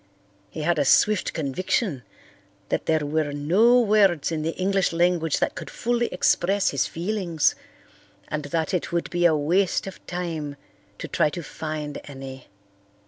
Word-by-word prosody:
He 155 - -6
had 170 0 +1
a - - +3
swift 205 +8 +3
conviction 160 - -1 0.7
that - - -2
there 155 -2 +2
were 150 0 0
no 195 +13 +4
words 200 - +3
in 160 -1 -2
the 165 +2 -2
English 195 0 +1
language 170 -2 +1
that - - 0
could - - -8
fully 240 0 0
express 190 +2 +2
his 140 - 0
feelings 175 -3 0 0.7
and 150 -1 -3
that 160 +3 -2
it 180 - -1
would 170 0 -2
be 175 0 +1
a 165 -2 +5
waste 170 +6 +1
of 195 - -9
time 165 -5 -4 0.4
to - - -6
try 150 - +2
to 170 +2 -6
find 155 -1 -5
any. 135 -2 -9
165 Hz, 155 wpm, -24 LUFS, 150-185 Hz, 0.7 s, a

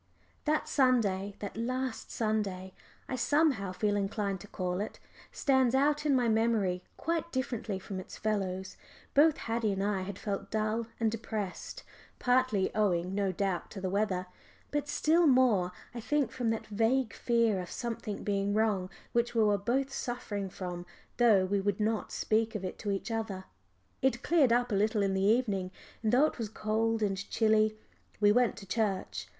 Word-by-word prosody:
That 305 0 +1
Sunday 205 -8 +2
that 205 - -5
last 255 +1 -3
Sunday 200 -4 -2 0.3
I 260 - -2
somehow 255 - +2
feel 205 +2 0
inclined 200 -1 -1
to - - -11
call 180 -1 -2
it 210 - -5 0.3
stands 265 -3 +2
out 295 +2 +2
in 280 - +4
my 245 -2 +2
memory 220 -5 +1
quite 335 0 -2
differently 235 -6 -2
from 190 0 -6
its 185 - -9
fellows. 190 -3 -2 0.4
Both 300 +2 +5
Haddie 225 -2 -1
and 195 0 -2
I 200 -1 -1
felt 195 0 -4
dull 220 +1 -1
and 225 -1 +2
depressed, 215 -4 -5 0.3
partly 250 -6 +2
owing 185 -4 +1
no 200 -1 +1
doubt 185 -1 -2
to 195 - -8
the 185 -1 -2
weather, 195 -3 0 0.5
but 295 0 -1
still 325 +3 +3
more, 245 -9 +4 0.2
I 240 - -5
think, 275 +1 0
from 240 -3 -1
that 225 0 -2
vague 225 +4 +1
fear 230 -4 +2
of 180 - -8
something 230 -3 -4
being 200 0 0
wrong 210 -4 +1 0.2
which 235 0 0
we 225 - +4
were 210 -1 +4
both 265 +7 0
suffering 205 -7 -3
from, 180 -1 -5 0.3
though 220 -6 +5
we 200 +1 0
would 200 0 -1
not 215 0 0
speak 220 +1 0
of 195 -3 -3
it 185 - -6
to 210 - -4
each 200 +3 -2
other. 220 -4 -3 0.6
It 260 -1 +1
cleared 300 -7 +4
up 245 0 +2
a - - 0
little 210 +1 +2
in 195 -1 +1
the 190 - 0
evening, 200 -3 +2 0.3
and 220 -1 +1
though 265 +5 +5
it 310 - -3
was 225 -2 -3
cold 220 +1 0
and 195 -2 0
chilly 215 -1 +3 0.4
we 205 -1 +5
went 245 +1 +3
to 195 - -9
church. 200 -2 -2
215 Hz, 175 wpm, -31 LUFS, 195-240 Hz, 0.6 s, Both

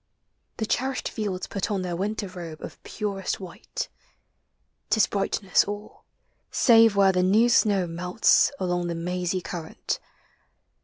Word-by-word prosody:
The 220 - -1
cherished 265 +4 -1
fields 200 -4 -3
Put 195 - -3
on 195 -3 -1
their 175 -1 -3
winter 205 +3 -2
robe 170 -4 -8
of - - -9
purest 200 -2 -3
white. 190 - -6 1.0
*T - - +3
is 220 - +5
brightness 195 -1 +1
all; 205 +1 -8 0.4
save 225 -4 +5
where 195 -1 +5
the 180 -1 +1
new 210 +6 +4
snow 205 -5 +3
melts 180 +10 +3
Along 180 -1 -1
the 170 - -2
mazy 180 +2 -2
current. 165 -1 -4
190 Hz, 140 wpm, -26 LUFS, 180-210 Hz, 1.0 s, is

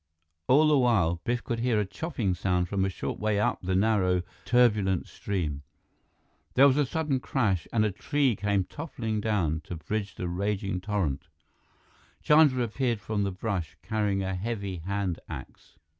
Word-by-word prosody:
All 150 +5 +6
the 150 -2 +4
while, 90 -10 +2
Biff 120 0 -1
could 115 - -3
hear 120 -2 +2
a 105 - +1
chopping 115 - -2
sound 90 0 0
from 95 +1 0
a 95 - +1
short 95 - -4
way 105 -1 +1
up 105 - +1
the 95 0 -1
narrow, 95 -3 +2 0.2
turbulent 105 -5 +3
stream. 80 -8 -3 0.9
There 135 - +7
was 130 - +4
a 145 -2 +2
sudden 150 -2 -1
crash, 100 - 0
and 110 -2 +2
a 105 - +1
tree 135 +5 +1
came 100 0 +1
toppling 115 - -4
down 90 -8 0
to 85 - -6
bridge 100 +6 -4
the 90 - -4
raging 95 +1 -2
torrent. 95 -9 -2 1.0
Chandra 150 -5 +5
appeared 120 0 -1
from 105 0 -2
the 100 -1 0
brush, 95 -4 -3
carrying 105 -3 0
a 95 0 -2
heavy 100 -1 -3
hand 95 +1 -2
axe. - - -10
105 Hz, 165 wpm, -28 LUFS, 95-120 Hz, 1.0 s, There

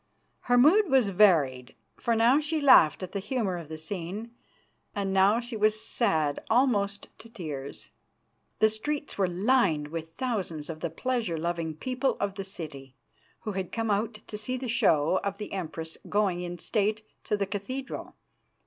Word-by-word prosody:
Her 245 - +5
mood 340 - +6
was 260 -6 +4
varied, 155 -11 +3 0.2
for 235 -2 0
now 235 +5 +5
she 310 +1 -1
laughed 195 - +6
at 185 - -6
the 200 - -2
humour 205 -3 -2
of 160 -3 -10
the 160 - -6
scene, 185 +7 -5 0.6
and 195 -1 -1
now 195 +4 +4
she 240 0 -6
was 215 0 +2
sad 160 - 0
almost 210 -5 +1
to 230 - -13
tears. 150 -10 -7 0.7
The 220 +1 +5
streets 285 +5 -3
were 190 - +3
lined 180 - +2
with 165 0 -6
thousands 185 - -3
of 155 - -9
the 170 - -2
pleasure 225 0 -2
loving 165 -1 -2
people 255 - -1
of 200 -1 -1
the 195 0 -5
city, 145 -8 -8 0.5
who 215 - -4
had 190 -2 -4
come 225 -2 -1
out 215 +3 0
to 210 0 -9
see 255 +4 -3
the 255 0 -5
show 165 -6 +3
of 200 0 -2
the 210 -1 -7
Empress 165 -3 -5
going 200 -4 +1
in 175 0 -5
state 215 +3 0 0.2
to 210 - 0
the 200 - 0
cathedral. 255 +8 -5
200 Hz, 170 wpm, -28 LUFS, 170-230 Hz, 0.7 s, mood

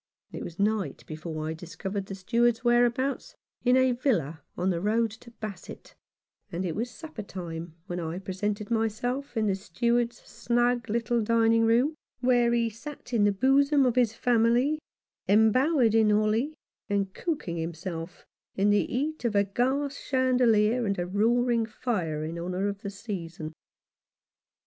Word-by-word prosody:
It - - -6
was 170 - -8
night 210 -1 0
before 155 0 -5
I 160 - -2
discovered 190 +4 -5
the 195 - -5
Steward's 230 +4 +1
whereabouts, 245 +3 +1 0.3
in 250 +1 +4
a 260 0 +4
villa 230 - 0 0.2
on 185 +2 +1
the 170 -1 -2
road 220 +2 +1
to 225 +2 -13
Basset, 215 -6 -9 0.6
and 180 +3 -2
it 165 - -2
was 235 +3 -2
supper 315 -2 -8
time 170 -4 -7
when 180 -2 -4
I 165 0 -4
presented 200 +3 -3
myself 235 +4 -1
in 220 - +2
the 200 - +2
Steward's 235 +6 0
snug 240 -1 0
little 235 +1 +1
dining 230 +1 +3
room, 240 +7 +3 0.3
where 245 -1 +3
he 235 -1 +2
sat 245 +3 -9
in 215 -3 +4
the 205 - +4
bosom 275 +6 +4
of 250 - +3
his 240 -4 +3
family, 245 +6 +2 0.5
embowered 230 +4 +4
in 220 -1 +4
holly, 215 +8 +2 0.3
and 200 -1 0
cooking 290 - -3
himself 165 +1 -5 0.3
in 200 +2 +3
the 205 - +4
heat 300 +5 -2
of 230 -3 0
a 200 - +5
gas 265 +7 -1
chandelier 250 -3 +3
and 200 - 0
a 175 - -1
roaring 230 +4 +2
fire 185 -10 -2
in 165 +2 -5
honour 180 +3 -2
of 200 0 -4
the 200 - -4
season. 175 -6 -6
220 Hz, 155 wpm, -28 LUFS, 190-245 Hz, 0.6 s, a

